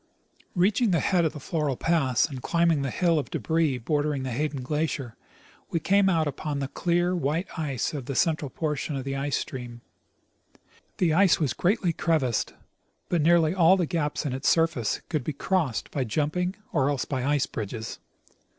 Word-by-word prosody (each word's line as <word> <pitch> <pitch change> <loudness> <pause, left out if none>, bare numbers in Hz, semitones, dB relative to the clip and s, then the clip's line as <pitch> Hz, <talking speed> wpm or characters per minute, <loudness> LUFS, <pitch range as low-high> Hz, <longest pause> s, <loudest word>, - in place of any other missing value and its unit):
Reaching 205 +6 +3
the 170 -3 +3
head 180 -3 +2
of 155 - 0
the 150 - -7
Floral 145 -2 -2
pass 150 -7 +2
and 135 -4 -7
climbing 170 -1 +2
the 135 - -1
hill 170 +3 +2
of 145 - -5
debris 160 -5 0
bordering 145 +2 -1
the 130 - -3
Hayden 145 +1 -2
glacier, 150 -3 -2 0.5
we 165 - 0
came 195 +3 +3
out 165 -4 +2
upon 145 +1 -3
the 140 -1 -2
clear, 175 +3 +1
white 165 +2 -1
ice 145 -6 -2
of 140 -5 -5
the 140 - -3
central 155 -3 +1
portion 150 0 -3
of 135 - -3
the 135 +1 -3
ice 140 0 -1
stream. 120 -2 -6 1.2
The 170 -4 +2
ice 190 +2 +4
was 150 -5 0
greatly 180 -2 +1
crevassed, 150 -9 0 0.5
but 175 -3 +1
nearly 165 0 +4
all 185 0 +5
the 180 - +1
gaps 155 -2 -2
in 135 - -1
its 130 +2 +1
surface 165 -9 +1
could 155 -6 -2
be 155 - -3
crossed 155 - -1
by 135 - -1
jumping 155 - -1 0.2
or 140 -3 +2
else 140 -3 -1
by 130 -3 -2
ice 145 0 +2
bridges. 110 +1 -6
150 Hz, 180 wpm, -26 LUFS, 135-170 Hz, 1.2 s, all